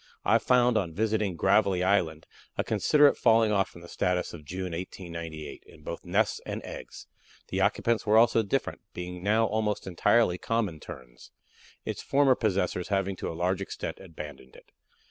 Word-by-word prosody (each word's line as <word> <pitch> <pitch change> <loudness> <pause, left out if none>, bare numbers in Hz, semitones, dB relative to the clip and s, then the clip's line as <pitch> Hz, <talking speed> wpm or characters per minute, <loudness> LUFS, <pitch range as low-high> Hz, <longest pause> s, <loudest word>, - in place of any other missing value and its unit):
I - - +4
found 125 -2 +3
on 85 -5 -4
visiting 105 -3 0
Gravelly 95 0 +3
Island 85 -5 +1 0.3
a - - +1
considerable 145 -1 +4
falling 115 -2 +4
off 100 -2 +2
from 85 - -14
the 85 - -11
status 90 +1 -1
of 80 -3 -9
June, 90 +4 -5
1896, 85 -3 -7
in 75 - -17
both 85 - -6
nests 100 +5 +1
and - - -4
eggs; - - -9 0.4
the 95 - -1
occupants 110 +3 +1
were 105 +1 +4
also 115 0 +5
different, 100 - -2
being 90 0 -6
now 110 +4 +3
almost 105 -1 -1
entirely 90 +1 +2
Common 110 -9 -1
Terns, 65 -8 -12 0.6
its - - -4
former 140 -1 +4
possessors 95 -6 -1
having 95 -1 0
to - - -4
a - - -7
large 90 +2 0
extent 100 - -5
abandoned 75 -7 -10
it." - - -18
95 Hz, 165 wpm, -28 LUFS, 85-110 Hz, 0.6 s, also